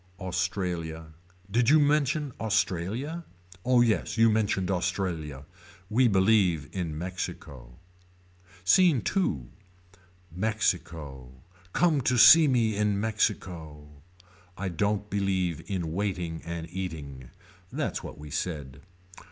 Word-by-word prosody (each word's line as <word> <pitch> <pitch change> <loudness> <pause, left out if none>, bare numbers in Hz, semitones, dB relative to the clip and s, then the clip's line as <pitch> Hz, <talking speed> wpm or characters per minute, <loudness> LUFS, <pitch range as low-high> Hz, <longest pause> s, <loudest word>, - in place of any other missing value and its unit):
Australia. 90 -4 -3 0.4
Did 120 +2 +3
you 155 +1 +6
mention 145 0 +1
Australia. 110 - -1 0.4
Oh 125 -1 +4
yes 115 -1 +1
you 115 0 +5
mentioned 100 -3 0
Australia. 85 -6 -2 0.5
We 125 +3 +4
believe 95 -7 +3
in 85 -5 -4
Mexico. 90 -8 -6 0.9
SCENE 150 - +4
II. 175 - +1 0.9
Mexico. 80 - -2 0.4
Come 160 -5 +3
to 125 0 +1
see 160 +6 +9
me 115 -5 +2
in 105 -1 +1
Mexico. 90 -8 -2 0.7
I 95 0 -3
don't 105 +4 -1
believe 95 -5 -1
in 85 -5 -3
waiting 90 -4 -3
and 85 -1 -5
eating. 75 -9 -6 0.4
That's - - -2
what - - -8
we 75 0 -10
said. 70 -6 -4
95 Hz, 105 wpm, -27 LUFS, 80-110 Hz, 0.9 s, see